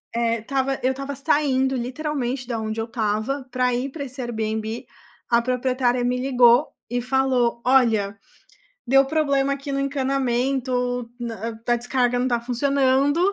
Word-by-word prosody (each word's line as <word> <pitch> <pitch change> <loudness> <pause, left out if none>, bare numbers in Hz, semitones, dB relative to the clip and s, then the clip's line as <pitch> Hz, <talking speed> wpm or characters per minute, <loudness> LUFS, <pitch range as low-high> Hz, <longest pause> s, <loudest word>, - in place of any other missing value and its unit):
eh, 230 0 +1
estava 270 +3 -1
eu 260 - +2
estava 275 +1 -5
saindo 265 -1 +1
literalmente 255 0 -3
da 235 -2 -2
onde 220 0 -3
eu - - -2
estava 225 +4 -2
pra 250 0 +1
ir 255 +3 -2
pra 280 -1 -5
esse 260 0 -8
Airbnb. 220 -1 -3 0.4
A 235 - +5
proprietária 250 0 0
me 250 +1 +1
ligou 250 +1 +5 0.2
e 245 +1 -1
falou: 250 -2 +1
"Olha, 225 -6 +3 0.7
deu 270 +2 +5
problema 280 -2 +1
aqui 275 0 -6
no 275 - -1
encanamento, 265 -2 0 0.5
hã, 225 -1 -5
a 240 - +4
descarga 245 0 0
não 250 +1 +1
tá 240 -2 +1
funcionando. 275 +4 +2
255 Hz, 150 wpm, -23 LUFS, 235-270 Hz, 0.7 s, A